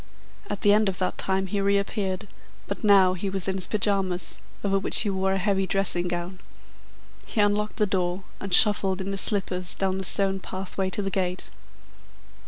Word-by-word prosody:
At 205 - -4
the 205 - +4
end 210 -1 +3
of 185 - -4
that 185 - -3
time 190 0 0
he 200 +2 -2
reappeared, 200 0 -1 0.4
but - - -6
now 195 -3 +5
he 190 +2 -4
was 190 -1 -2
in 190 - 0
his 185 - -1
pyjamas, 195 -4 0 0.2
over 195 -1 +1
which 195 - +3
he 205 - 0
wore 190 0 0
a - - 0
heavy 195 0 0
dressing 180 -3 +2
gown. 175 +1 -5 0.9
He - - -4
unlocked 210 +1 +1
the 210 - +2
door, 185 -1 -2 0.2
and 195 - -7
shuffled 195 -1 +4
in 190 +1 -4
his 195 - +1
slippers 185 -3 +1
down 190 -1 -1
the - - -4
stone 195 +1 +2
pathway 190 0 -4
to 200 +2 -3
the 195 - -3
gate. 185 -1 -3
195 Hz, 190 wpm, -25 LUFS, 185-200 Hz, 0.9 s, now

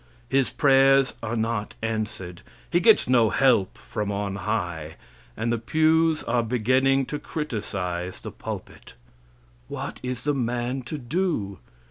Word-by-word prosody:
His 135 -1 +2
prayers 135 -1 +4
are 115 +1 -3
not 110 -2 -2
answered; 105 -6 -3 0.3
he - - +4
gets - - +5
no 120 -3 +4
help 125 -8 +3
from 105 -1 -4
on 100 -1 -2
high, 85 -7 -3 0.4
and 115 +2 0
the 115 - -1
pews 160 +5 +2
are 120 +1 +1
beginning 130 +4 +2
to 150 - -4
criticize 95 - -4
the - - -7
pulpit. - - -8 0.7
What - - -6
is 125 -1 -4
the 145 - +1
man 125 0 -1
to 155 - -3
do? 130 - -2
120 Hz, 135 wpm, -25 LUFS, 105-135 Hz, 0.7 s, gets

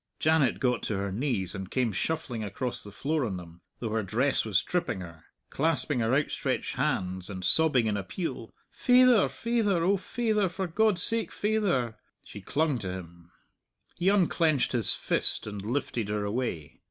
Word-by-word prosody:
Janet 155 -5 +2
got 125 -2 +1
to 105 - -1
her 100 0 -2
knees 110 -4 -1
and 95 -2 -6
came 125 -2 0
shuffling 125 - -2
across 115 +5 -3
the 105 - -9
floor 150 +7 -1
on 100 -6 -2
them, 85 -1 -12 0.2
though 115 -3 -4
her 110 0 +1
dress 120 +8 +1
was 105 -4 +1
tripping 120 - -2
her, 85 -3 -11 0.3
clasping 155 -2 +1
her 115 +2 +2
outstretched 140 -2 -1
hands, 95 -10 -1
and 95 -2 -5
sobbing 150 -7 +4
in 105 -1 0
appeal, 115 - -4 0.2
"Faither, 250 -3 +5
faither; 220 -7 0
O 195 +3 +3
faither; 215 0 0
for 190 +2 -3
God's 185 +1 +2
sake, 230 -1 -1
faither!" 195 - 0 0.2
She 105 - -10
clung 140 +5 0
to 95 -4 -4
him. 85 -1 -10 0.6
He 180 - +2
unclenched 170 -7 +2
his 120 -6 +4
fist - - 0
and 105 -2 -6
lifted 115 -1 -2
her 105 -1 -1
away. 100 - -3
125 Hz, 165 wpm, -28 LUFS, 100-165 Hz, 0.6 s, Faither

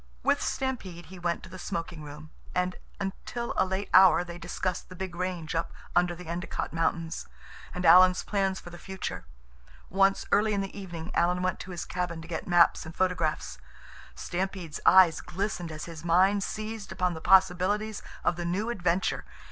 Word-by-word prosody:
With - - +2
Stampede 195 -11 -3
he 185 +2 -11
went 170 -1 -1
to 185 - -10
the 185 0 -9
smoking 170 -2 -4
room, 150 +1 -10 0.2
and 180 0 0 0.2
until 205 +4 -4
a - - +4
late 190 +1 -2
hour 185 -1 +7
they 175 0 -8
discussed 175 +1 -3
the 185 - -10
big 185 -1 -5
range 180 -3 -3
up 165 0 -1 0.2
under 175 0 +3
the 180 +1 -10
Endicott 170 0 -4
Mountains, 165 0 -1 0.4
and 180 0 -4
Alan's 180 +2 +7
plans 195 -2 0
for 175 - -11
the 175 - -10
future. 190 - -5 0.7
Once, 195 +1 +3
early 210 +1 +3
in 200 - 0
the 195 - -6
evening, 175 -4 -7
Alan 180 +1 +2
went 185 -1 0
to - - -8
his 175 -2 -5
cabin 180 -2 -3
to - - -11
get 165 -1 -4
maps 175 -1 +5
and 160 +1 -9
photographs. 155 - -1 0.6
Stampede's 180 -3 -4
eyes 185 -4 +7
glistened 185 -2 -3
as 155 0 -6
his 165 -1 -9
mind 185 +4 +4
seized 215 0 -5
upon 180 -1 0
the 160 - -7
possibilities 190 +4 +3 0.2
of 175 - +1
the 175 - -3
new 195 +7 -1
adventure. 180 -3 0
180 Hz, 180 wpm, -28 LUFS, 170-190 Hz, 0.7 s, hour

